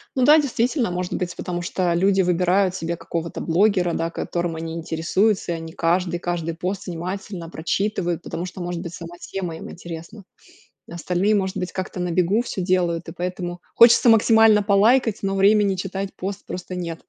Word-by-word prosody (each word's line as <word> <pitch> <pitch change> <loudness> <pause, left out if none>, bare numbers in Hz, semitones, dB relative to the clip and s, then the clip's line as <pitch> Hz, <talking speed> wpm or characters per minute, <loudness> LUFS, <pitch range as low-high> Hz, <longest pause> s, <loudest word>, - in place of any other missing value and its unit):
Ну 260 - +2
да, 300 +3 +8
действительно, 250 - 0
может 180 0 -3
быть, 180 -1 -3
потому 175 -1 -4
что 175 0 -1
люди 190 +3 +3
выбирают 180 +1 +2
себе 165 0 -3
какого-то 165 0 -5
блогера, 180 0 +2
да, 165 0 -1
которым 170 0 -3
они 160 0 -5
интересуются, 170 +5 0
и - - -1
они 165 0 -8
каждый 175 +1 0
каждый 170 -2 -3
пост 185 +4 -4
внимательно 180 0 -5
прочитывают, 175 +1 -1
потому 170 - -5
что, 185 0 -8
может 175 -1 -4
быть, 170 -2 -7
сама 170 0 -9
тема 180 -4 -5
им - - -9
интересна. 170 +5 -9 0.7
Остальные, 180 +5 0
может 190 -2 -1
быть, 180 - -3
как-то 185 0 -5
на 180 -1 -1
бегу 180 +6 +2
всё 220 -5 -4
делают, 175 -2 0
и - - -6
поэтому 180 0 -4
хочется 235 +1 +7
максимально 225 -1 +5
полайкать, 220 +3 +3
но 195 0 -1
времени 200 0 +4
читать 195 +1 -4
пост 195 +2 -5
просто 180 0 -6
нет. 170 -2 -5
180 Hz, 175 wpm, -22 LUFS, 170-200 Hz, 0.7 s, да